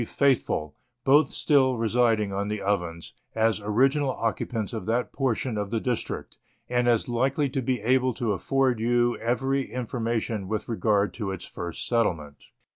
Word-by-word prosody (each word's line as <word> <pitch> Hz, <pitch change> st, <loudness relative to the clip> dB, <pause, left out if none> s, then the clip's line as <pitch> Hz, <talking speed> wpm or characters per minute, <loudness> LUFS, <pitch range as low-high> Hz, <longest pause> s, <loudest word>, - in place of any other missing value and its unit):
Faithfull, 115 Hz, -, 0 dB, 0.3 s
both 140 Hz, +2 st, +5 dB
still 130 Hz, -4 st, +2 dB
residing 115 Hz, -3 st, +2 dB
on 100 Hz, +1 st, -2 dB
the 105 Hz, 0 st, -2 dB
Ovens, 85 Hz, -5 st, -2 dB, 0.2 s
as 110 Hz, -1 st, +2 dB
original 135 Hz, +7 st, +2 dB
occupants 115 Hz, -3 st, -2 dB
of 110 Hz, -, -5 dB
that 120 Hz, +2 st, 0 dB
portion 125 Hz, -4 st, -1 dB
of 100 Hz, -1 st, -3 dB
the 115 Hz, +1 st, -1 dB
district, 120 Hz, 0 st, -4 dB, 0.3 s
and 120 Hz, 0 st, +1 dB
as 115 Hz, -2 st, +2 dB
likely 135 Hz, +4 st, +1 dB
to 135 Hz, 0 st, -2 dB
be 125 Hz, 0 st, -1 dB
able 130 Hz, +2 st, +2 dB
to 120 Hz, -4 st, -1 dB
afford 130 Hz, +3 st, +1 dB
you 120 Hz, +1 st, +2 dB
every 135 Hz, +3 st, 0 dB
informa 120 Hz, -2 st, -2 dB
tion 105 Hz, -3 st, -4 dB
with 110 Hz, +1 st, -3 dB
regard 105 Hz, -4 st, +1 dB
to 105 Hz, -4 st, -4 dB
its 95 Hz, -1 st, -5 dB
first 85 Hz, +9 st, -6 dB
settlement. 80 Hz, -11 st, -1 dB
115 Hz, 160 wpm, -26 LUFS, 105-130 Hz, 0.3 s, both